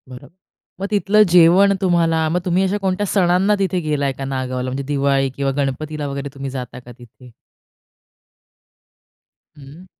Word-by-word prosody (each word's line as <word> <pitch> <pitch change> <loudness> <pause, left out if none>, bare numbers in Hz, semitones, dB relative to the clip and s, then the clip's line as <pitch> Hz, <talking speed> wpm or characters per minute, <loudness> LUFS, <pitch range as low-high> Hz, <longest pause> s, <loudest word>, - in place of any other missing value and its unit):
बरोबर, 125 -1 -11 0.5
मग 195 - -2
तिथलं 210 +1 +3
जेवण 180 +3 +5
तुम्हाला 165 -3 +1
मग 175 +3 0
तुम्ही 180 +1 +1
अशा 195 +2 0
कोणत्या 190 +1 -1
सणांना 190 +2 +2
तिथे 190 -2 0
गेलाय 150 -4 -1
का 135 +1 -7
नागावला, 130 -1 -3
म्हणजे 135 +2 -4
दिवाळी 140 -1 0
किंवा 140 -1 -1
गणपतीला 145 +2 -3
वगैरे 140 0 -5
तुम्ही 135 -1 -6
जाता 125 -1 -7
का 125 0 -14
तिथे? 120 +1 -17 2.3
हं. 145 +6 -14
150 Hz, 145 wpm, -19 LUFS, 135-180 Hz, 2.3 s, जेवण